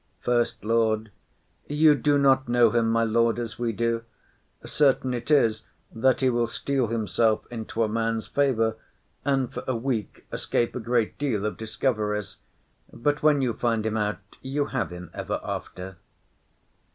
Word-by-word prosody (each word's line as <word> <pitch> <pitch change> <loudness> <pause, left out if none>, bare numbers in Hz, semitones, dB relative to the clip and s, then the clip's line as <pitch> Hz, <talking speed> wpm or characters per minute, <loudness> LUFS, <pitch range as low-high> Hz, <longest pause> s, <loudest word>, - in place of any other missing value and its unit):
SECOND 120 -1 +2
LORD. 110 -1 +1 0.6
You 150 +1 +5
do 145 0 +2
not 135 -2 +3
know 120 -2 +5
him, 115 -1 +2
my 115 0 +2
lord, 115 +1 +2
as 120 -2 -5
we 120 -1 0
do; 115 +1 -1 0.6
certain 135 -3 +2
it 120 +3 -5
is 115 -7 +3 0.3
that 130 +4 +2
he 130 - +4
will 120 -1 +1
steal 125 +2 -1
himself 110 0 +1
into 115 -1 -2
a - - +1
man's 115 0 -1
favour, 115 -6 +1 0.5
and 135 -3 0
for - - -5
a 130 - 0
week 115 -3 -3
escape 120 - -1
a - - -2
great 115 0 0
deal 120 -8 -1
of 105 - -2
discoveries, 110 -3 -2 0.5
but 145 +4 -1
when 150 -2 +4
you 120 -3 +1
find 115 -1 0
him 110 0 -1
out, 105 -1 0 0.2
you 140 +2 -1
have 130 -3 0
him 90 -1 -9
ever - - -3
after. 90 +1 -6
115 Hz, 160 wpm, -26 LUFS, 110-130 Hz, 0.6 s, You